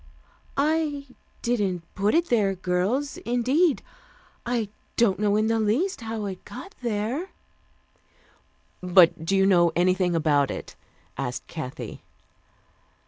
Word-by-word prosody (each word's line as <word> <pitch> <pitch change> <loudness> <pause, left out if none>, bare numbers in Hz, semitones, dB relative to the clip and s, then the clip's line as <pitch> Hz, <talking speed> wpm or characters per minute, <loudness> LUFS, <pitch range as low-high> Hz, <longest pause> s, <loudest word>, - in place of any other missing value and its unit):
"I 295 -1 +1 0.4
didn't 200 -8 0
put 200 +6 +1
it 340 +1 +2
there, 205 -5 +2
girls, 190 +10 -1
indeed. 260 +7 +1 0.6
I 235 -4 0 0.3
don't 205 -5 +3
know 205 -1 +2
in 215 +1 +2
the 225 0 +1
least 250 - 0
how 225 -2 -4
it 190 -2 -6
got 305 +11 -10
there 235 - -2 0.8
" - - -36
"But 180 -3 +5
do 195 +4 +1
you 195 0 +4
know 175 -3 +5
anything 180 0 +2
about 145 -4 +2
it?" - - -6 0.4
asked 125 -2 -3
Kathy. 145 -6 -7
210 Hz, 125 wpm, -25 LUFS, 180-245 Hz, 0.8 s, But